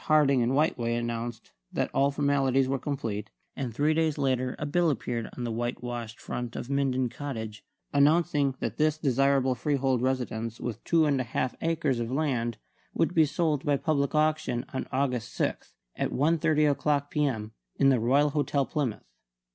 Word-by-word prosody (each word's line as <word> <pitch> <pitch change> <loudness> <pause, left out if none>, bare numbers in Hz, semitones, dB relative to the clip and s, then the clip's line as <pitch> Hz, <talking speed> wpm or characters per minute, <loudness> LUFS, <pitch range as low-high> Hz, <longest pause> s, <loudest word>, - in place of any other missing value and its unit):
Harding 145 -4 +4
and 120 +2 +1
Whiteway 120 -6 +1
announced 120 0 -4 0.2
that - - -1
all 140 +1 +3
formalities 135 -2 +2
were 135 0 -1
complete; 115 -7 -3 0.3
and 130 -4 -3
three 145 +7 +2
days 160 -1 +1
later 130 -2 0
a 150 - -3
bill 170 +3 +2
appeared 120 -4 -2
on 125 - -3
the 120 - -2
whitewashed 120 0 -4
front 120 -1 -5
of 130 - -5
Minden 130 -2 +1
Cottage 115 -5 -6 0.3
announcing 145 -1 +3
that - - -3
this 155 0 +2
desirable 135 -2 +2
freehold 135 -1 0
residence 120 -3 -2
with 115 -2 -5
two 165 -2 +3
and 140 -3 +2
a - - -1
half 125 +1 -2
acres 160 -6 0
of 115 -1 -2
land 125 -6 0 0.4
would 165 +1 +1
be 160 -2 +5
sold 150 -2 0
by 145 -1 +2
public 140 0 0
auction 150 -5 +1
on 130 - -3
August 130 -3 -1
6, - - -2 0.2
at - - -1
1.30 155 0 +2
o'clock 145 0 0
p.m., 130 -8 -1 0.2
in 135 - +4
the 130 -3 +4
Royal 140 +6 +3
Hotel, 145 -1 +1
Plymouth. 130 -3 -2
135 Hz, 170 wpm, -28 LUFS, 120-150 Hz, 0.4 s, be